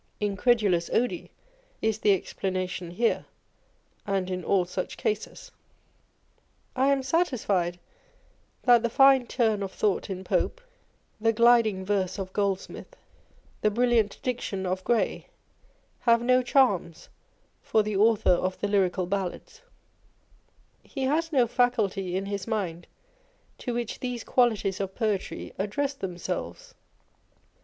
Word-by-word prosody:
Incredulas 205 -3 +1
odi 245 +2 0 0.5
is 220 -1 0
the 210 - +3
explanation 185 -1 -2
here, 225 +7 0 0.8
and 190 -2 -1
in 180 -1 -3
all 185 +1 +2
such 180 - -5
cases. 435 - -3 1.2
I 265 +1 +2
am 275 -1 +2
satisfied 220 - 0 0.9
that 240 -2 +6
the 235 - 0
fine 270 0 +5
turn 220 -4 +1
of 195 -1 -4
thought 205 0 -1
in 190 -1 -5
Pope, - - 0 0.6
the 225 +1 +3
gliding 225 -4 +4
verse 190 -2 -1
of 190 -1 -6
Goldsmith, 200 -2 -3 0.7
the 215 - +3
brilliant 230 -1 +1
diction 220 -6 -3
of 185 +1 -2
Gray 235 +2 0 0.7
have 235 -1 +3
no 255 +1 +4
charms 245 - +1 0.5
for 220 - +2
the 210 -1 -3
Author 215 0 +4
of 185 +1 0
the 205 - -1
Lyrical 190 -2 +1
Ballads: 195 - -4 1.2
he 270 - -6
has 320 +5 0
no 260 -5 +4
faculty 215 -7 0
in 195 - -3
his 200 0 -4
mind 185 -7 -3 0.7
to 245 - -4
which 240 -2 -3
these 245 -2 -4
qualities 215 -6 +1
of 195 -1 -4
poetry 215 -5 -2
address 265 +9 -1
themselves. 270 - -5
210 Hz, 125 wpm, -27 LUFS, 190-245 Hz, 1.2 s, that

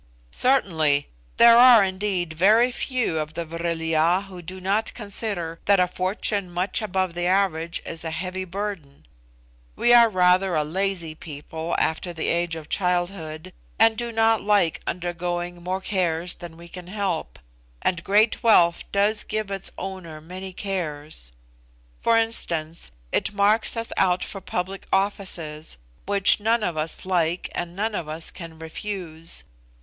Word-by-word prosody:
"Certainly; 160 - +2 0.3
there 235 0 +8
are 245 -4 +8
indeed 185 -3 -1
very 215 +9 +4
few 245 -10 -1
of 155 +1 -5
the 170 0 -3
Vril 165 0 -3
ya 165 +4 +2
who 190 -3 -10
do 185 +2 -8
not 200 +4 -1
consider 200 -6 -2
that 200 -1 +5
a 180 - +4
fortune 185 +1 -1
much 180 +4 -1
above 190 -4 -1
the 175 +1 -1
average 175 -3 0
is 165 0 -6
a 165 - -3
heavy 185 +3 -4
burden. 185 -6 -6 0.7
We 240 - +4
are 235 -1 +8
rather 185 -1 +3
a 155 - +2
lazy 175 0 -2
people 160 +2 -6
after 175 +2 -1
the 160 - -2
age 170 -1 0
of 160 -2 -8
childhood, 175 -2 -2 0.2
and 225 0 +5
do 235 +1 -3
not 225 -1 +3
like 200 -5 +2
undergoing 175 0 -3
more 185 +2 -3
cares 175 -3 -1
than 170 -2 -10
we 170 0 -12
can 180 0 -10
help, 195 -4 -3 0.5
and 170 -2 0
great 210 +4 +3
wealth 175 -8 +4
does 205 +2 +2
give 215 -2 -3
its 195 -2 -2
owner 185 -5 -7
many 185 +4 -7
cares. 155 - -4 0.7
For 230 0 +4
instance, 170 -8 -1 0.2
it - - 0
marks 210 +3 +2
us 230 0 -2
out 180 -1 +2
for 195 - -5
public 190 +2 -4
offices, 180 - 0 0.3
which 200 0 +4
none 225 +2 +1
of 175 -5 -1
us 155 +3 -3
like 175 -2 0
and 175 0 -4
none 215 +3 -1
of 170 -6 -3
us 160 +1 -2
can 165 -3 -10
refuse. 165 0 -4
180 Hz, 155 wpm, -24 LUFS, 165-200 Hz, 0.7 s, there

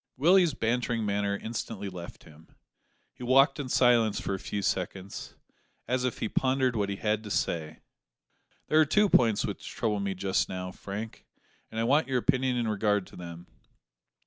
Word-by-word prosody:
Willie's 170 +1 +4
bantering 115 -1 0
manner 100 0 0
instantly 110 -2 -5
left 90 -2 -9
him. 80 +1 -17 0.7
He - - -18
walked 135 +3 +4
in 135 -3 -4
silence 120 -4 +3
for - - -3
a 95 - -3
few 100 +1 -4
seconds, 95 +1 -3 0.5
as 130 0 0
if 125 - -2
he - - -2
pondered 130 +1 +1
what 100 -2 0
he 100 - -2
had 105 +1 -1
to 105 - -8
say. 80 -5 -2 0.8
"There 155 - +3
are 155 - +6
two 210 +8 +3
points 115 - +4
which - - -6
trouble 105 -2 -1
me 100 -1 -2
just 95 +1 0
now, 90 0 -4
Frank, 105 +4 -7 0.4
and 110 - -5
I - - +1
want 140 +6 +3
your 130 -1 0
opinion 130 0 +1
in 120 -2 0
regard 105 -2 +1
to - - -15
them. 85 -1 -9
110 Hz, 175 wpm, -28 LUFS, 100-125 Hz, 0.8 s, are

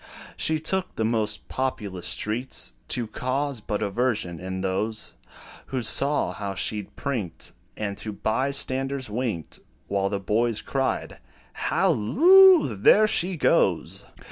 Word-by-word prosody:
She 160 0 +1
took 185 +4 -1
the 110 - -1
most 110 -2 -1
populous 105 -9 -3
streets, 110 - -1
To 120 - 0
cause 130 +3 -3
but 105 +1 -3
aversion 105 -5 -1
in 95 0 -5
those, 105 +3 -2 0.5
Who 130 -2 -3
saw 140 -3 +2
how 100 +1 -5
she 105 +4 0
'd 100 - -17
prinked, 115 - -4 0.3
And 100 -2 -3
to 110 - -5
bystanders 130 +3 -1
winked, 110 - -3 0.3
While 100 0 0
the 100 - -2
boys 110 +3 0
cried, 135 -1 -2 0.3
"Halloo! 345 - +5
there 205 - +5
she 185 -3 0
goes!" - - +1
110 Hz, 125 wpm, -25 LUFS, 100-135 Hz, 0.5 s, Halloo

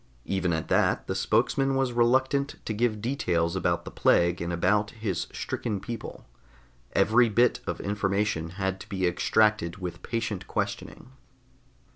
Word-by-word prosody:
Even 95 -2 0
at 80 -1 -2
that - - +2
the - - -2
spokesman 135 0 +1
was 135 -2 0
reluctant 130 +4 +2
to 110 - -2
give 110 -1 0
details 85 -10 0
about - - 0
the - - -7
plague 85 0 +2
and 85 0 -2
about 100 +5 +2
his 105 -5 -2
stricken 105 -4 -3
people. 115 +3 -7 0.7
Every 110 +5 +4
bit 120 +3 +3
of - - -3
information 100 -4 -1
had 95 -1 -1
to - - -11
be 95 -2 -1
extracted 90 0 +2
with 90 -2 -6
patient 110 -5 -3
questioning. 130 - -4
105 Hz, 145 wpm, -27 LUFS, 90-120 Hz, 0.7 s, Every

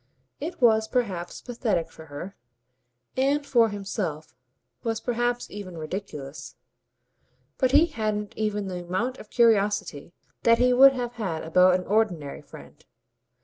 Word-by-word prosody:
It 320 +5 -5
was 220 -3 +4
perhaps 195 -9 -2
pathetic 230 -8 -2
for 160 - -13
her, 165 +7 -8 0.8
and 280 +2 +1
for 235 -5 +4
himself 195 -7 -4 0.5
was 225 -1 -2
perhaps 240 0 -1
even 190 -4 -8
ridiculous; 155 -4 -7 1.0
but 260 - +3
he 295 +4 +6
hadn't 215 -9 -3
even 210 -2 -1
the 180 -2 -5
amount 225 +9 -2
of - - -12
curiosity 205 -8 +1 0.3
that 230 0 +5
he 250 +1 +4
would 270 +2 +8
have 245 -2 -3
had 165 -6 -2
about 180 +3 +5
an 180 - -8
ordinary 185 -9 0
friend. - - -14
210 Hz, 135 wpm, -26 LUFS, 180-245 Hz, 1.0 s, would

